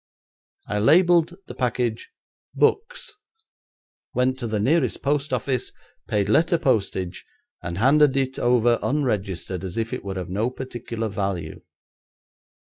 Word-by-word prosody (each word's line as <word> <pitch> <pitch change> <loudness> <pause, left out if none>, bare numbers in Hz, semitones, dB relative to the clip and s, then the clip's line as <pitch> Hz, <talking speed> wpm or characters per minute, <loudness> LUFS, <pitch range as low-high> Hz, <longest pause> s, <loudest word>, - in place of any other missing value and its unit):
I 105 0 -2
labelled 170 - +4
the - - -8
package 120 -2 -1 0.5
"Books", 475 +4 0 1.0
went 130 +1 +1
to 120 - -3
the 110 -1 -1
nearest 150 +11 +1
post 145 +1 0
office, 130 -3 -1 0.4
paid 100 -1 0
letter 165 - +3
postage, 100 - -1 0.4
and 85 +1 -5
handed 140 +4 +4
it 135 -1 -1
over 120 -1 +3
unregistered 100 - -1
as 95 +1 -5
if 115 0 -2
it - - -4
were 95 -1 -5
of 90 -2 -4
no 105 +6 0
particular 120 -3 -5
value. 95 -6 -3
120 Hz, 130 wpm, -24 LUFS, 100-140 Hz, 1.0 s, labelled